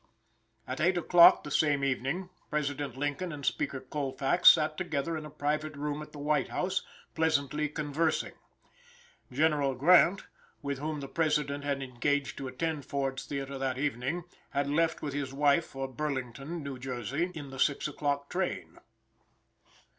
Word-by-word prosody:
At - - -4
8 180 +2 +3
o'clock 175 0 +7
the 150 - -7
same 145 -1 +2
evening, 140 +7 -1 0.2
President 145 -3 -2
Lincoln 145 +5 -2
and 145 -2 -7
Speaker 135 +1 -1
Colfax 135 +4 +3
sat 155 0 +4
together 165 -2 -2
in 155 -1 -5
a - - -11
private 150 +1 -2
room 145 +1 -3
at 150 - -10
the - - -11
White 145 -2 +1
House, 190 +1 -1 0.3
pleasantly 150 -2 +1
conversing. 155 +2 -1 1.0
General 145 -1 +2
Grant, 175 +6 +5 0.4
with 140 -1 -3
whom 150 0 -3
the 135 - -5
President 150 -1 0
had 140 -1 -1
engaged 135 +2 -1
to 135 - -4
attend 150 +3 -3
Ford's 135 -2 -3
Theater 140 -1 -4
that 130 -1 -1
evening, 140 +4 -1 0.3
had 140 0 -1
left 165 +3 +1
with 145 -2 -3
his 140 -2 -3
wife 145 +3 +3
for 135 0 -5
Burlington, 135 +3 -4
New 140 -2 -6
Jersey, 135 - -2
in 145 -3 -7
the 135 - -8
6 145 +2 +2
o'clock 145 -1 -2
train. 185 +4 -3
145 Hz, 155 wpm, -30 LUFS, 135-155 Hz, 1.0 s, o'clock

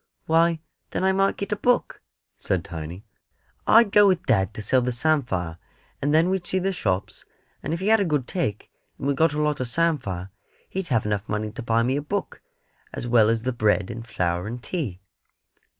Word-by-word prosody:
"Why, 165 0 +3 0.3
then - - -2
I 190 - +4
might 195 +1 +1
get 200 - -4
a - - +2
book," 245 +4 0 0.4
said - - -1
Tiny. 85 +6 -7 0.6
"I'd 225 -2 +6
go 205 0 +7
with 185 -3 +1
dad 95 -5 +2
to - - -5
sell 130 +4 +3
the 125 +1 -1
samphire; 120 - 0 0.4
and 145 - +1
then 165 +4 +4
we'd 190 -2 -2
see 190 - 0
the 190 +1 0
shops; 95 - -2 0.4
and 150 - -4
if 165 - -1
he 195 +3 0
had 225 0 +6
a - - +3
good 150 -8 0
take, 135 - -3 0.3
and - - -6
we 140 - +2
got 160 +2 +2
a 150 - -2
lot 150 -1 0
of 130 - -1
samphire, 120 - -1 0.4
he'd 190 -1 -4
have 115 -8 +1
enough 105 0 -2
money 105 0 -2
to 130 - -7
buy 115 -1 +1
me 130 +3 +1
a - - -1
book, 195 +7 -4 0.5
as - - -5
well 115 -3 +5
as 115 0 0
the 130 0 -1
bread 105 -3 +1
and 115 0 -8
flour 90 -3 -1
and 120 +2 -6
tea." 120 - -4
130 Hz, 210 wpm, -24 LUFS, 105-170 Hz, 0.6 s, go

